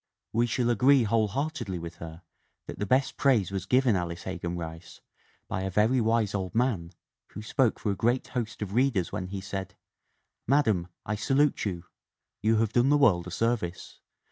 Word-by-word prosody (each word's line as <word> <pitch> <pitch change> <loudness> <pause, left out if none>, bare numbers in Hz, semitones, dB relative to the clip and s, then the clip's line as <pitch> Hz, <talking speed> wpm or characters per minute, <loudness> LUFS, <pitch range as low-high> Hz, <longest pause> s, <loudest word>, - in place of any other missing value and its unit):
We 120 +2 +2
shall 120 +1 +1
agree 130 +3 +5
whole 110 0 +2
heartedly 120 - -3
with 85 0 -8
her 80 +1 -9 0.4
that - - -8
the 105 - -2
best 130 +5 +1
praise 120 -9 +2
was 95 -1 -4
given 125 -3 +3
Alice 85 -1 -3
Hegan 90 -2 -4
Rice 80 0 -8 0.5
"by 95 - -3
a 95 - -2
very 110 +7 +2
wise 110 -2 +1
old 95 -1 -3
man, 115 -9 0 0.4
who 105 - -7
spoke 125 +1 +1
for 105 - -1
a - - -1
great 120 +5 0
host 115 -3 -3
of 100 -1 -6
readers 120 -7 +1
when 90 - -4
he 95 +1 -5
said: 95 0 -6 0.4
' - - -50
'Madam, 110 -10 +2 0.2
I 110 - -2
salute 135 +7 +1
you! 90 -4 -4 0.6
You 110 +2 +3
have 110 -1 +1
done 120 +3 +3
the 145 - +5
world 90 -11 +3
a - - -7
service. 100 -4 -2
105 Hz, 190 wpm, -28 LUFS, 90-120 Hz, 0.6 s, agree